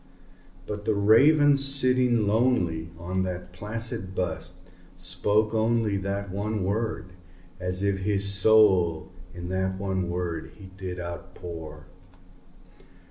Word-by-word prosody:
But 105 0 -6
the 110 -1 +1
Raven, 140 +8 +5
sitting 130 -4 +4
lonely 100 -8 +1
on 90 +2 -3
that 90 -1 -5
placid 105 0 -4
bust, 90 0 -3 0.3
spoke 105 +5 0
only 110 -1 +1
That 100 0 -3
one 105 +1 -3
word, 105 -1 -3 0.5
as 90 +1 -3
if 100 -1 0
his 100 0 0
soul 100 -5 +4 0.2
in 90 0 -7
that 95 0 -1
one 95 -2 -2
word 85 -3 -4
he 95 -2 -13
did 90 -1 -6
outpour. 85 -3 -8
95 Hz, 115 wpm, -26 LUFS, 90-110 Hz, 0.5 s, Raven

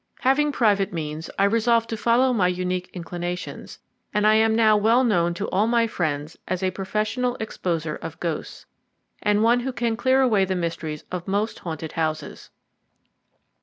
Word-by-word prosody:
Having 275 +3 +3
private 205 -5 +2
means, 155 -2 -5
I 195 - +3
resolved 230 +2 +3
to - - 0
follow 240 +3 +3
my 195 -6 +3
unique 180 0 -2
inclinations, 175 0 -6 0.3
and 210 0 +1
I 215 - +6
am 220 0 +4
now 220 -1 +5
well 225 +5 +4
known 175 -7 +2
to - - -3
all 205 +4 +2
my 235 0 +3
friends 155 -7 -3
as 185 0 -2
a 185 - +1
professional 215 +6 -1
exposer 165 -7 -3
of 165 -1 -8
ghosts, 170 -3 -4 0.6
and 210 0 +2
one 235 +2 +4
who 260 +2 -3
can 235 -2 -1
clear 260 +3 +3
away 220 -7 +3
the 190 0 -1
mysteries 165 -3 -3
of 180 -1 -5
most 205 +3 -1
haunted 160 -2 -6
houses. 155 -1 -3
200 Hz, 165 wpm, -24 LUFS, 175-230 Hz, 0.6 s, I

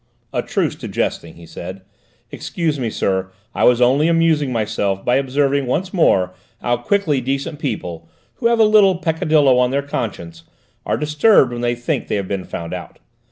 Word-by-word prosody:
"A - - 0
truce - - -1
to - - -7
jesting," 85 - -3
he 85 - -13
said; 95 +3 -9 0.5
"excuse 160 -5 -3
me, 120 -3 -1
sir, 95 -3 -1 0.2
I - - +1
was 125 0 +4
only 135 +6 +4
amusing 165 -4 +2
myself 105 -4 -1
by 125 - +3
observing 140 0 0
once 180 +9 -2
more 95 - +2 0.3
how 120 0 0
quickly 150 +1 0
decent 140 +4 -3
people, 85 - -5 0.3
who 235 - +1
have 235 0 +2
a 225 - +5
little 210 -4 +5
peccadillo 155 -6 +2
on 125 0 +3
their 140 +2 -1
conscience, 85 -11 -5 0.5
are - - +1
disturbed 150 - +3
when 120 0 -5
they 120 0 0
think 120 0 -3
they - - -1
have 100 -2 -2
been 95 -2 -3
found 85 0 -6
out. - - -8
130 Hz, 180 wpm, -19 LUFS, 100-155 Hz, 0.5 s, a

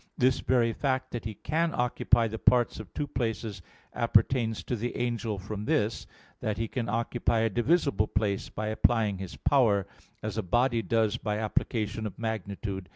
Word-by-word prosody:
This 130 +1 +3
very 120 -3 +2
fact 130 0 -1
that 120 - -5
he 110 -1 -4
can 165 - 0
occupy 120 -1 +2
the 110 0 -5
parts 120 -3 +3
of 110 -4 -9
two 145 - -1
places 115 -7 -3 0.3
appertains 115 0 +2
to 125 - -2
the 120 +2 -3
angel 115 -3 -1
from 100 +2 -5
this, 105 +1 0 0.3
that 105 -1 -2
he 115 0 -1
can 120 +1 -3
occupy 115 0 0
a 115 -1 +1
divisible 120 - +2
place 100 -2 -1
by 110 0 -3
applying 110 -3 +2
his 95 -2 -6
power; 110 -9 +3 0.4
as 110 0 -2
a - - +2
body 120 +5 +2
does 110 -2 +1
by 105 -1 -2
application 110 0 -1
of 100 - -9
magnitude. 100 -4 -4
110 Hz, 170 wpm, -29 LUFS, 105-120 Hz, 0.4 s, This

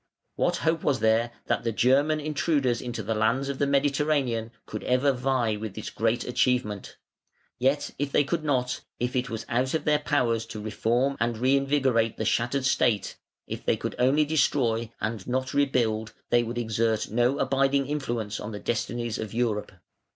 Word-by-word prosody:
What - - +1
hope 165 0 +2
was 140 -4 +1
there 110 +2 +3 0.2
that - - 0
the 115 - 0
German 140 +7 +3
intruders 145 -5 0
into 120 -3 -4
the 110 +3 -1
lands 115 +6 +1
of 140 - -4
the 140 - +2
Mediterranean 140 -4 +1 0.2
could - - -6
ever 130 +3 +3
vie 125 -4 0
with 105 -2 -6
this 110 - -6
great 115 +2 0
achievement? 125 -5 0 0.6
Yet 135 +3 +1
if 145 -1 -1
they 145 - +4
could 155 +3 -2
not, 130 -4 0 0.2
if 125 +1 -2
it 125 0 0
was 115 -1 -5
out 125 +4 0
of 160 - -2
their 150 -1 +3
power 125 -6 +1
to 115 -1 -7
reform 120 +6 0
and 115 0 0
reinvigorate 130 -2 +2
the 110 - -2
shattered 120 +5 +1
state, 115 -5 +1 0.3
if - - -6
they - - +1
could - - -4
only 135 +5 +4
destroy 120 -7 +1
and 110 -2 -3
not 130 +1 -1
rebuild, 115 -6 +1 0.2
they 120 - +5
would 120 +1 -4
exert 110 -2 0
no 120 +4 +2
abiding 135 0 +2
influence 120 -7 -3
on 110 - -6
the 105 - -6
destinies 120 +1 -2
of 110 0 -5
Europe. 115 -3 -1
125 Hz, 175 wpm, -27 LUFS, 115-140 Hz, 0.6 s, they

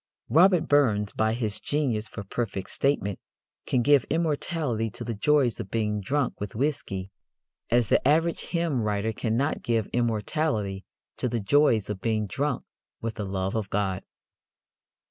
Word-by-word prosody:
Robert 175 - +5
Burns, 110 -8 +3
by 110 +1 +1
his 110 -3 -2
genius 125 -8 -1
for 100 - -7
perfect 100 -2 -4
statement, 120 -9 0 0.5
can 125 -2 +2
give 145 -2 +5
immortality 150 -7 -1
to - - -7
the 115 - -3
joys 130 +2 +2
of 95 - -5
being 105 -1 -1
drunk 140 +5 -1
with 105 0 -5
whiskey 110 -8 -2 0.6
as 120 -1 +3
the - - +3
average 165 +3 +2
hymn 165 -7 0
writer 105 +1 0
cannot 120 +7 0
give 115 -3 0
immortality 110 -3 -1 0.3
to 125 - -1
the 120 0 -1
joys 115 -1 +3
of 105 -3 -5
being 110 -1 0
drunk 140 +6 -2 0.4
with 115 0 -3
the 105 - -4
love 95 0 -2
of 110 -4 -2
God. 95 -2 -1
115 Hz, 150 wpm, -27 LUFS, 105-145 Hz, 0.6 s, Robert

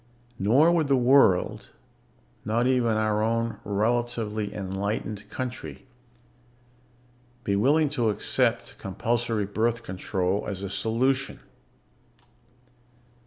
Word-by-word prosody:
Nor 130 - +4
would 165 -4 +2
the 140 - +3
world 125 -7 +3 0.7
not 115 +3 0
even 125 -4 +2
our 110 -1 +1
own 115 +1 -1
relatively 110 0 -1
enlightened 100 +1 -4
country 125 +2 -6 1.6
be 100 -2 0
willing 145 +9 +3
to 120 -5 0
accept 105 - -1
compulsory 115 +2 -1
birth 115 +3 -1
control 95 +1 -2
as 100 -1 -5
a 100 - -4
solution. 125 +7 0
110 Hz, 95 wpm, -26 LUFS, 100-120 Hz, 1.6 s, Nor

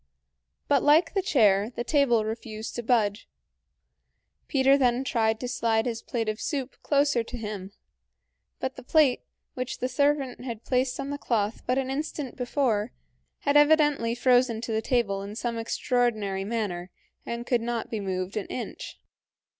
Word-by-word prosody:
But 280 -3 +3
like 315 +3 +4
the 390 - +1
chair, 215 - +3
the 240 - -2
table 240 -5 +3
refused 220 0 -5
to - - -2
budge. 220 -2 +1 1.2
Peter 270 0 +4
then 255 -2 +2
tried 225 -4 +1
to 250 - -4
slide 230 -3 +1
his 235 -2 -3
plate 230 -2 -3
of 215 0 -2
soup 275 -4 -3
closer 285 -4 +2
to 245 +2 -7
him, 210 -4 -6 0.9
but 260 0 -4
the - - -7
plate, 280 -1 +3 0.3
which 255 0 -4
the 255 - -1
servant 275 -1 0
had 235 -3 -6
placed 255 0 0
on 275 +1 -3
the 285 - -4
cloth 220 -4 -1
but 250 +1 +1
an 265 -1 -1
instant 290 -1 -4
before, 245 -4 0 0.5
had 285 0 +1
evidently 295 -5 +4
frozen 245 -2 +3
to 230 - -4
the 220 0 0
table 220 -5 0
in 200 +1 -7
some 235 0 -3
extraordinary 220 -5 0
manner 200 -5 -3 0.3
and 235 0 -5
could 245 -2 +1
not 235 -1 -3
be 220 - -2
moved 185 -1 -3
an 210 - -3
inch. 245 - -6
240 Hz, 160 wpm, -27 LUFS, 220-265 Hz, 1.2 s, like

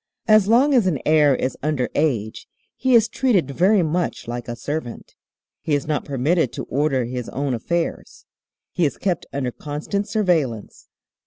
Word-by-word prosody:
"As 215 -2 +5
long 255 +6 +4
as 235 -7 +4
an 165 -6 +1
heir 150 -3 +4
is 130 - -2
under 145 -4 0
age 120 -8 -1 0.3
he 260 -1 +2
is 225 -1 +5
treated 200 - +1
very 185 +6 +3
much 170 -2 -2
like 120 0 -5
a 120 - -4
servant. 135 0 -6 0.5
He 150 - 0
is 140 - -2
not 150 -1 -2
permitted 140 +1 0
to - - -5
order 135 -3 0
his 125 0 -5
own 140 0 -2
affairs. 165 +8 -3 0.5
He 180 - -1
is 145 - 0
kept 185 -3 -2
under 135 -3 -2
constant 155 - -4
surveillance. 170 - -1
150 Hz, 165 wpm, -21 LUFS, 130-185 Hz, 0.5 s, As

